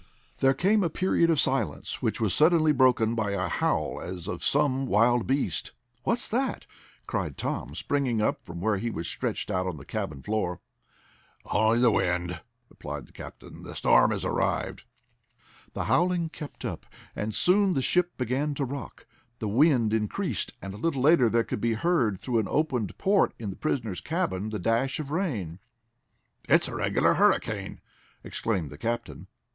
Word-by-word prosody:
There 135 0 +4
came 205 +3 +3
a 170 - +1
period 170 0 +2
of 160 -4 +3
silence, 135 -2 -1
which - - -1
was - - +1
suddenly 155 +1 +4
broken 125 -5 +3
by 105 -3 -1
a 95 -2 -1
howl - - -1
as 90 -1 -6
of - - -5
some 135 -2 +2
wild 115 +3 +3
beast. 135 +2 -1 0.3
"What's 235 - 0
that?" 260 +4 -1 0.4
cried - - -3
Tom, - - -3
springing 135 -6 0
up 105 - 0
from 85 0 -8
where 105 +1 +1
he 115 +5 -2
was 85 -6 -4
stretched - - -3
out 90 0 0
on 90 -4 -4
the 70 - -11
cabin 70 -3 -4
floor. 105 -5 -1 0.9
"Only 110 +2 +2
the 120 -1 +5
wind," 90 -3 0 0.3
replied 75 - -7
the - - -21
captain. - - -11
"The - - -9
storm - - +5
has - - -2
arrived." - - -1 0.9
The - - -2
howling 175 -1 +2
kept 150 -2 -9
up, - - -5 0.3
and 105 0 -3
soon 190 - +3
the 135 - +1
ship 175 +3 +1
began 135 +4 -1
to 140 - -1
rock. 135 -3 -7 0.3
The 110 - -3
wind 120 -1 +3
increased, 105 -2 -2
and 95 0 -6
a - - -8
little 135 +1 -1
later 140 -6 +5
there 115 +1 +2
could 105 - -4
be 115 -1 +1
heard, 115 - +1
through 120 -3 0
an 105 - -1
opened 130 - -1
port 200 0 +2
in 105 -4 -4
the - - -8
prisoners' 115 -11 -2
cabin, 150 - -2
the 110 - -3
dash 115 - 0
of 145 -2 -5
rain. 115 - -2 0.9
"It's - - +5
a - - -6
regular - - +2
hurricane!" - - +1 0.4
exclaimed 95 -10 -2
the 75 - -11
captain. 120 +1 -4
120 Hz, 175 wpm, -27 LUFS, 105-150 Hz, 0.9 s, the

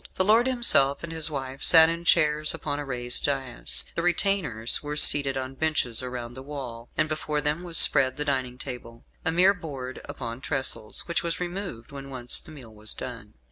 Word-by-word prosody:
The 185 - 0
lord 225 +5 +3
himself 200 - +1
and 170 - -7
his 160 -1 -2
wife 135 -2 -7
sat 160 -1 +6
in 170 +1 -4
chairs 155 -2 +2
upon 145 -2 -5
a 145 - -6
raised 120 -2 +1
daïs. 135 -4 -3
The - - -3
retainers 170 - +2
were 150 0 -6
seated 140 -2 +7
on 130 0 -6
benches 135 -5 -1
around 125 -1 -7
the 130 - -11
wall, 130 -5 -9
and 155 - +1
before 155 -1 -4
them 150 +3 -2
was 170 -3 +1
spread 130 -2 +7
the 150 - -4
dining 130 -3 -3
table 125 -3 -10 0.2
a 160 - -1
mere 180 +4 +3
board 135 -8 -9
upon 125 -4 -8
trestles 135 -7 -1
which 170 - -3
was 170 -1 -5
removed 180 - -7
when 140 -1 -10
once 125 -2 0
the - - -14
meal 130 -8 -13
was 105 0 -2
done. 115 -4 -10
140 Hz, 195 wpm, -24 LUFS, 125-160 Hz, 0.2 s, seated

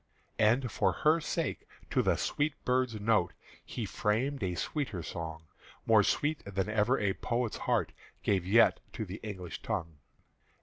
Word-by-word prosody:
And 120 +3 +3
for - - +2
her 155 +2 +6
sake, 155 0 -2 0.2
to - - +3
the - - +2
sweet 145 0 0
bird's 125 -3 +1
note, 105 -4 +2 0.3
He - - -4
framed 130 +7 0
a 90 -2 -1
sweeter 110 - -3
Song, 80 -1 -6 0.4
More 110 -2 +6
sweet 150 +8 0
than 100 0 -2
ever 110 +5 +2
a 100 -2 +1
poet's 120 -1 -2
heart - - +2 0.3
Gave 95 -3 +2
yet 105 +6 +5
to 110 - -3
the 95 +2 -7
English 95 -5 -6
tongue. 85 -9 -3
110 Hz, 150 wpm, -31 LUFS, 95-125 Hz, 0.4 s, her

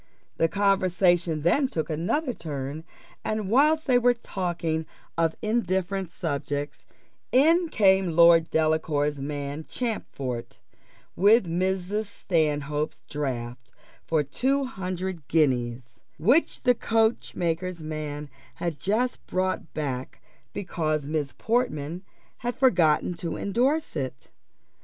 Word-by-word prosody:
The 165 - +3
conversation 180 -4 +2
then 265 - +3
took 160 -10 -3
another 210 - -1
turn, 145 -2 -5 0.4
and 215 -2 -2
whilst 305 +5 +4
they 250 -3 +4
were 245 0 +4
talking 170 -7 -3 0.3
of 165 -1 +1
indifferent 195 -4 0
subjects, 145 -3 -4 0.4
in 325 +6 +4
came 190 - +3
Lord 170 -1 +6
Delacour's 155 -2 +1
man, 145 +1 -4
Champfort, 135 - -4 0.6
with 205 +3 +5
Mrs. 190 +4 -1
Stanhope's 150 -5 -1
draft 125 -4 -4 0.3
for 160 -2 +1
two 265 - 0
hundred 185 - -5
guineas, 125 -6 0 0.2
which 250 - +2
the 250 - +5
coachmaker's 185 -7 0
man 150 -1 -5 0.3
had 170 -4 -3
just 220 - 0
brought 185 -2 -1
back 135 -4 -4 0.3
because 155 -6 -2
Miss 145 -4 -2
Portman 180 - -1 0.4
had 245 0 -3
forgotten 180 - +3
to 170 -1 -4
endorse 260 +10 0
it. 130 -1 -5
170 Hz, 105 wpm, -26 LUFS, 150-210 Hz, 0.6 s, Lord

